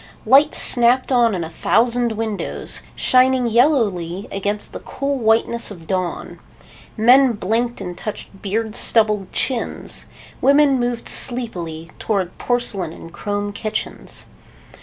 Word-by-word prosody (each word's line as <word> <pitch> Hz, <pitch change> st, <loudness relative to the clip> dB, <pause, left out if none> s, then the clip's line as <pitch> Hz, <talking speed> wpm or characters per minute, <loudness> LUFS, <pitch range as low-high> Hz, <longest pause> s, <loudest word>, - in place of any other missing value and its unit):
Lights 285 Hz, +3 st, +5 dB
snapped 245 Hz, +2 st, +4 dB
on 235 Hz, -4 st, +3 dB
in 175 Hz, -, -3 dB
a 160 Hz, -, -6 dB
thousand 235 Hz, +6 st, +1 dB
windows, 220 Hz, -2 st, -3 dB
shining 255 Hz, 0 st, +3 dB
yellowly 215 Hz, -, +1 dB
against 205 Hz, +1 st, -3 dB
the -, -, -6 dB
cool 275 Hz, 0 st, -3 dB
whiteness 230 Hz, +1 st, +1 dB
of 175 Hz, -6 st, -11 dB
dawn. 185 Hz, -1 st, -3 dB, 0.6 s
Men 250 Hz, +3 st, +5 dB
blinked 230 Hz, +4 st, -1 dB
and 180 Hz, -1 st, -6 dB
touched 205 Hz, -1 st, -8 dB
beard 215 Hz, +2 st, -2 dB
stubbled 210 Hz, -5 st, +2 dB
chins. 250 Hz, -4 st, -3 dB, 0.3 s
Women 280 Hz, -1 st, +4 dB
moved 240 Hz, -1 st, -2 dB
sleepily 170 Hz, -10 st, -2 dB
toward 190 Hz, -5 st, -2 dB
porcelain 220 Hz, -8 st, -1 dB
and 165 Hz, 0 st, -12 dB
chrome 205 Hz, 0 st, -3 dB
kitchens. 215 Hz, +1 st, -4 dB
225 Hz, 120 wpm, -20 LUFS, 195-245 Hz, 0.6 s, Lights